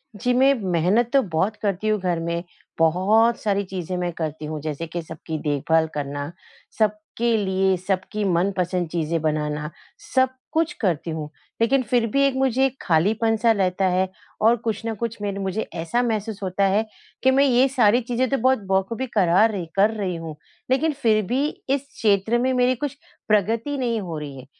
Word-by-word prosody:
जी, 250 +4 0
मैं 270 +2 +5 0.2
मेहनत 190 +8 +2
तो 275 - +6
बहुत 190 +1 -1
करती 200 0 -1
हूँ 215 -1 +2
घर 180 -2 -1
में 170 +1 -2 0.4
बहुत 200 +8 +3
सारी 200 -2 0
चीज़ें 185 -2 -5
मैं 175 -1 -1
करती 155 -2 -4
हूँ, 155 0 -4
जैसे 155 +2 -4
कि 170 +2 -4
सबकी 160 0 -6
देखभाल 160 +2 +1
करना, 145 +1 -4 0.5
सबके 215 +2 0
लिए 190 -1 +1
सबकी 195 +2 -1
मनपसंद 180 -1 0
चीज़ें 165 0 -1
बनाना, 150 -1 -1 0.5
सब 260 0 +5 0.2
कुछ 325 +1 +1
करती 170 -5 0
हूँ। 155 -2 -5 0.3
लेकिन 260 +3 +3
फिर 240 +1 +1
भी 275 +6 +1
एक 270 - -1
मुझे 265 0 +2
एक 265 0 -2
खालीपन 215 +7 +2
सा 230 +1 +3
रहता 190 -2 +1
है 185 +1 +1 0.3
और 225 +2 +5
कुछ 225 -2 -4
ना 225 - -1
कुछ 230 +1 -4
मेरे 200 -1 -3
मुझे 195 +2 -2
ऐसा 170 +8 0
महसूस 220 -3 -2
होता 190 +1 0
है 205 +3 +2 0.4
कि 260 - +5
मैं 270 +1 +4
ये 255 0 +4
सारी 245 -3 +3
चीज़ें 245 +2 -1
तो 275 - +1
बहुत 260 +1 +3
बखूबी 205 +7 0
करा 185 +2 +5
र 190 -5 -4
कर 200 +2 +5
रही 190 -4 -2
हूँ 165 -2 -7 0.4
लेकिन 300 +4 +2
फिर 215 -3 +3
भी 260 +8 0 0.2
इस 275 0 +2
क्षेत्र 210 +2 +2
में 255 +2 +1
मेरी 250 0 +3
कुछ 280 +2 -3 0.3
प्रगति 225 +7 +1
नहीं 235 -4 0
हो 170 -4 -5
रही 145 -2 -7
है। 130 - -10
205 Hz, 185 wpm, -23 LUFS, 170-235 Hz, 0.5 s, तो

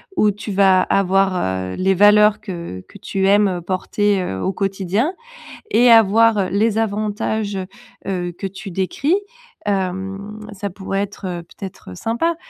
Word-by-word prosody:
où 210 -9 +3
tu 210 +1 -7
vas 190 -1 +4
avoir, 195 0 +2 0.4
heu, - - -5
les 190 +1 +2
valeurs 210 +2 +5
que 170 - -7
que - - -14
tu 195 0 -1
aimes, 205 +1 +5
heu, 180 -2 -3
porter, 195 +2 0
heu, 95 - -4
au 190 - -1
quotidien. 195 - -1 0.6
Et 245 +1 +5
avoir 225 -2 +5
les 215 +2 +1
avantages, 210 -1 -1
heu 185 - -3 0.4
heu, 180 -2 -2
que 195 - -5
tu 195 +1 -9
décris, 235 - 0 0.5
hem, 195 +2 -3
ça 200 +1 -4
pourrait 195 +1 -3
être, 205 0 -6
heu, 175 -1 -5
peut-être, 185 - -10
heu, 90 - -9
sympa? 285 - -1
195 Hz, 160 wpm, -20 LUFS, 190-210 Hz, 0.6 s, valeurs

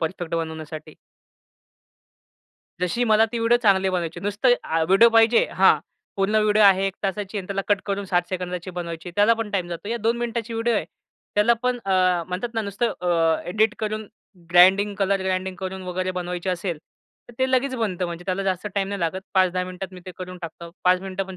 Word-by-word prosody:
Perfect 165 0 -3
बनवण्यासाठी. 160 -1 -5 1.9
जशी 180 +7 0
मला 220 0 +4
ती 235 - -2
व्हिडिओ 230 +1 +4
चांगली 195 -2 +4
बनवायची. 175 -2 -3
नुसतं 205 +6 +2
आ 165 0 0
व्हिडिओ 195 +8 +6
पाहिजे 225 +1 +5
हां. - - +5 0.4
पूर्ण 195 +2 0
व्हिडिओ 215 0 +3
आहे 195 -1 +5
1 195 +1 -3
ची 200 +2 -6
आणि 190 - -6
त्याला 195 0 -2
कट 205 -1 +3
करून 200 0 -2
60 180 0 -1
ची 185 - -6
बनवायची. 170 -1 -6
त्याला 210 +3 +5
पण 225 -2 -4
टाईम 185 -3 -1
जातो. 175 +4 -6
या 235 - -1
2 235 +1 -1
ची 230 - -7
व्हिडिओ 230 +1 +1
आहे. 205 - 0 0.5
त्याला 210 +3 +4
पण 250 -1 0
अ, 185 -2 +2
म्हणतात 185 +7 -3
ना 225 - 0
नुसतं 200 +4 -1
अ, 165 -2 +2
एडिटकरून 215 +1 0 0.4
ग्राइंडिंग 190 +4 +5
कलर, 195 0 +1
ग्राइंडिंग 185 0 -2
करून 190 0 -5
वगैरे 185 0 -2
बनवायची 180 0 -4
असेल, 175 -3 -2 0.5
तर 240 - -13
ते 260 0 +1
लगेच 260 +1 +1
बनतं 190 -6 -1
म्हणजे 170 0 -7
त्याला 195 +1 -1
जास्त 190 +1 -2
टाईम 195 -1 0
नाही 200 -1 -4
लागत. 170 +2 -1
5-10 185 -1 +2
मिनिटात 185 +1 -7
मी 180 - -10
ते - - -5
करून 180 0 -7
टाकतो. 170 +1 -8
5 180 0 +4
मिनिटं 195 0 -4
पण 190 -1 -9
190 Hz, 190 wpm, -23 LUFS, 180-210 Hz, 1.9 s, व्हिडिओ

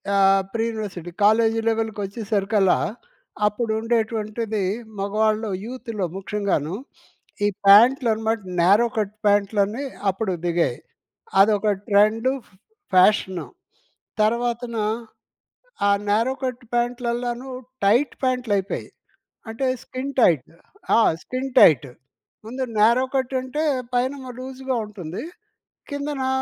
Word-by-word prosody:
ఆహ్, 195 0 +4
pre-university, 215 -6 -3
college 225 +1 +4
లెవెల్‌కొచ్చేసరికల్లా 210 -2 0 0.7
అప్పుడు 220 +2 -2
ఉండేటువంటిది, 220 -2 -1 0.4
మగవాళ్ళలో, 215 +1 0
యూత్‌లో 230 -5 -4
ముఖ్యంగాను. 195 -5 -2 0.7
ఈ - - +4 0.2
ప్యాంట్లనమాట 225 +1 +5 0.2
న్యారో 200 +7 +5
కట్ 210 -1 -1
ప్యాంట్లని 205 +4 +2 0.3
అప్పుడు 190 0 -1
దిగాయి. 170 -8 +1 0.6
అదొక 210 +1 +4 0.2
ట్రెండు, 215 +5 +3 0.6
ఫ్యాషను. 185 -1 +3 0.7
తర్వాతన 235 +2 0 1.1
ఆ - - +4 0.2
న్యారో 225 +5 +2
కట్ 255 -1 -3
ప్యాంట్లల్లానూ 240 +1 -2 0.4
టైట్ 240 +8 +3
ప్యాంట్లైపోయాయి. 230 -7 -1 0.6
అంటే, 225 +4 -2 0.2
స్కిన్ 265 +2 -5
టైట్. 160 - +3 0.5
ఆ! - - +5 0.2
Skin 260 +1 -4
tight. 140 - +6 0.6
ముందు 255 +4 -3
న్యారో 235 +4 +5
కట్టంటే 260 +2 -1 0.3
పైనేమో 260 +2 -1
లూజుగా 260 0 -4
ఉంటుంది, 185 -5 -7 0.7
కిందనా 285 -2 -3
220 Hz, 90 wpm, -23 LUFS, 200-245 Hz, 1.1 s, టైట్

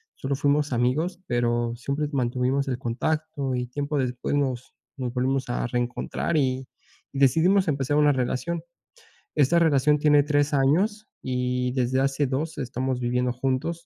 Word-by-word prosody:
solo 135 +1 -2
fuimos 145 0 +1
amigos, 140 +9 0
pero 120 -1 0
siempre 140 +4 -2
mantuvimos 130 +2 0
el 125 - -1
contacto, 140 +3 -2
y 125 0 -2
tiempo 145 +4 -3
después 125 0 -2
nos 130 -4 -1 0.2
nos 125 -3 -4
volvimos 130 +1 0
a 120 - -1
reencontrar, 120 +7 -2
y 130 -2 0 0.4
y 135 - -5
decidimos 170 +8 +4
empezar 145 -1 0
una 150 -1 +5
relación. 135 +6 -2 0.7
Esta 150 +3 +3
relación 150 -2 +3
tiene 145 0 +5
3 145 0 +1
años, 185 +11 +2
y 125 0 -1
desde 130 0 +1
hace 135 +1 +1
2 145 +4 -3
estamos 130 -1 -2
viviendo 125 0 0
juntos. 135 +7 -2
135 Hz, 145 wpm, -25 LUFS, 125-150 Hz, 0.7 s, una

